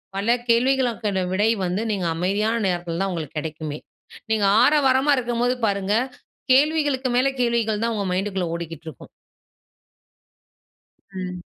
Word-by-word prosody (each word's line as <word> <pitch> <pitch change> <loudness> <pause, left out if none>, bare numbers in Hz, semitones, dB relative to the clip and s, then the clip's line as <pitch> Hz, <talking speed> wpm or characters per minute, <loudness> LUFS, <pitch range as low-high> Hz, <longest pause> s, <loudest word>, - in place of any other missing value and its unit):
பல 200 +3 -1 0.2
கேள்விகளுக்கான 235 -4 +1
விடை 205 +4 +2 0.2
வந்து, 180 +4 -1
நீங்க 195 -4 -2
அமைதியான 200 +6 0
நேரத்தில 175 -2 -2
தான் 195 0 0
உங்களுக்கு 160 -4 -5
கிடைக்குமே! 155 -1 -5 0.5
நீங்க 215 -2 +2 0.2
ஆரவாரமா 275 0 +4
இருக்கும்போது 245 0 0
பாருங்க, 200 0 0 0.6
கேள்விகளுக்கு 290 -2 +2
மேல 255 +2 +3
கேள்விகள்தான் 230 -1 0
உங்க 200 -2 -2
மைண்டுக்குள்ள 190 -1 -1
ஓடிக்கிட்டு 165 -2 -7
இருக்கும். 155 - -13 2.0
ம். 180 -1 -6
210 Hz, 115 wpm, -23 LUFS, 180-245 Hz, 2.0 s, ஆரவாரமா